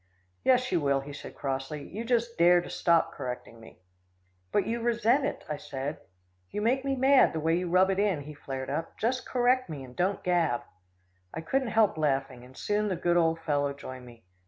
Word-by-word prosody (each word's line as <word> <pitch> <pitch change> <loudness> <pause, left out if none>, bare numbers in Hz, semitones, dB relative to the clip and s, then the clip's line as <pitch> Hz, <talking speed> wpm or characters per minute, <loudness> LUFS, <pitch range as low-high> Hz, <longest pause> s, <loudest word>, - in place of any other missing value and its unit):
"Yes, 255 0 +3
you 175 -3 +2
will," 140 -1 +2
he 145 +1 -9
said 145 - -9
crossly. 135 +1 -4
"You 215 +5 -6
just 235 -1 0
dare 175 +1 +6
to 175 - -7
stop 170 -1 +2
correcting 125 -2 -6
me." 110 - -15 0.7
"But 200 - +2
you 230 +2 -2
resent 235 +3 +2
it," - - -5
I 150 - -3
said. 145 0 -5 0.5
"You - - -4
make 250 +5 +1
me 275 -1 0
mad, 265 +1 +5
the 160 - -2
way 165 +2 +2
you 180 -1 -3
rub 185 +2 +4
it 190 - -1
in," 200 -7 +1
he 150 +2 -9
flared 135 -2 -6
up. 155 +3 -4
"Just 255 +3 -1
correct 255 -1 +2
me, 145 -4 -6
and 125 -1 -12
don't 185 +3 0
gab." 170 -8 +1 0.7
I 160 - -3
couldn't 265 +10 0
help 220 -7 +2
laughing, 135 -4 -1
and 130 +1 -15
soon 210 0 0
the 190 - -1
good 175 0 +1
old 165 -1 +2
fellow 145 -3 0
joined 130 -2 -9
me. 120 -1 -15
170 Hz, 205 wpm, -28 LUFS, 140-225 Hz, 0.7 s, dare